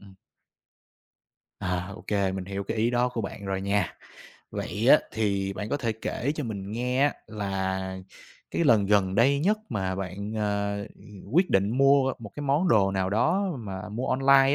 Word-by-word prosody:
Ừm. 100 -1 -15 1.5
À, 90 +1 -2
ô - - -11
kê, 100 -2 +1
mình 95 -1 -4
hiểu 100 +1 -4
cái 115 - -3
ý 115 +2 +2
đó 125 +1 +2
của 125 -2 -4
bạn 100 -1 -6
rồi 95 0 -1
nha. 100 -3 0 0.5
Vậy - - -2
á - - +8
thì 100 -3 0
bạn 105 +2 -5
có - - 0
thể 115 -5 -1
kể 115 +5 -2
cho 150 - -3
mình 100 -3 -5
nghe 125 +3 0
á, 145 - +4
là 95 -3 -3 0.5
cái 170 - 0
lần 110 -8 +5
gần 95 -2 +3
đây 135 +7 +4
nhất 210 +7 +2
mà 95 -4 -2
bạn, 100 +3 -5
à, 100 -1 -1 0.5
quyết 180 +5 +3
định 95 +1 +3
mua 135 -1 +5
1 110 -4 -9
cái 145 - -4
món 145 +6 +2
đồ 100 -8 +4
nào 95 -1 0
đó 155 - +2
mà 100 -2 -6
mua 115 +5 -3
online 135 +1 +5
105 Hz, 185 wpm, -27 LUFS, 95-130 Hz, 1.5 s, á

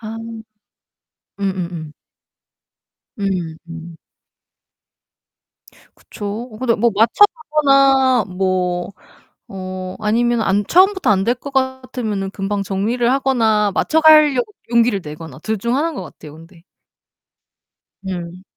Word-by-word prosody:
아. 220 0 -7 1.2
음음음. 175 -5 -4 1.3
음. 180 -5 -2
음. 165 0 -9 2.0
그쵸. 215 +3 -7
근데 235 -3 +2
뭐 235 +2 +2
맞춰 225 - +5
가거나 275 -6 +3
뭐 180 0 -1 0.9
어 185 0 -7
아니면 230 +2 +1
안 200 +1 +1
처음부터 380 - +3
안 195 -1 +2
될 240 - +2
것 280 +3 -10
같으면은 255 -7 -2
금방 200 0 -3
정리를 225 +6 0
하거나 225 -6 +2
맞춰 320 - +2
가려고 305 +1 +5 0.2
용기를 235 -3 +3
내거나 150 -2 -9
둘 220 -1 -2
중 235 +5 -1
하나인 320 +3 -1
것 - - -5
같아요 150 0 -12
근데. 165 +1 -16 1.4
음. 180 -1 -6
215 Hz, 205 characters per minute, -18 LUFS, 185-260 Hz, 2.0 s, 맞춰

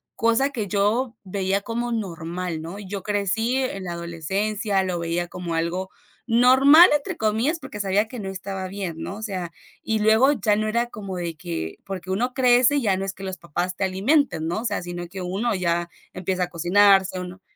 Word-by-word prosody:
cosa 230 +5 +2
que 235 -7 -3
yo 215 +5 +1
veía 195 0 -1
como 235 +3 -3
normal, 175 -5 -4
¿no? 175 +5 -7
Yo 200 -1 -6
crecí 210 +4 0
en 255 -8 -2
la 175 -2 -4
adolescencia, 190 +5 -1
lo 185 -2 -2
veía 170 +1 -2
como 175 -1 -5
algo 175 +3 -2 0.4
"normal", 265 +8 +7
entre 285 - -3
comillas, 225 +10 0
porque 235 -8 -6
sabía 200 +2 +1
que 245 +2 -9
no 195 -2 -4
estaba 190 0 -5
bien, 190 -4 -4
¿no? 195 - -5
O - - -9
sea, 185 -6 -4 0.3
y 220 -1 0
luego 220 +6 +5
ya 210 -6 +2
no 215 +1 -1
era 235 +2 +1
como 195 -5 -6
de 170 -2 -4
que, 80 - -5
porque 185 -1 -7
uno 245 +7 0
crece, 250 +2 +4
ya 205 -7 +1
no 190 - -3
es 195 0 -3
que 195 - -11
los 190 -1 -4
papás 175 +3 -3
te - - -2
alimenten, 190 - +1
¿no? 175 +6 -2
O 245 - -7
sea, - - -1
sino 175 0 -6
que 190 0 -7
uno 195 +7 -1
ya 175 -1 0 0.2
empieza 185 0 -1
a - - -1
cocinarse, 190 +2 +4
uno 180 +1 -8
195 Hz, 200 wpm, -24 LUFS, 180-225 Hz, 0.4 s, normal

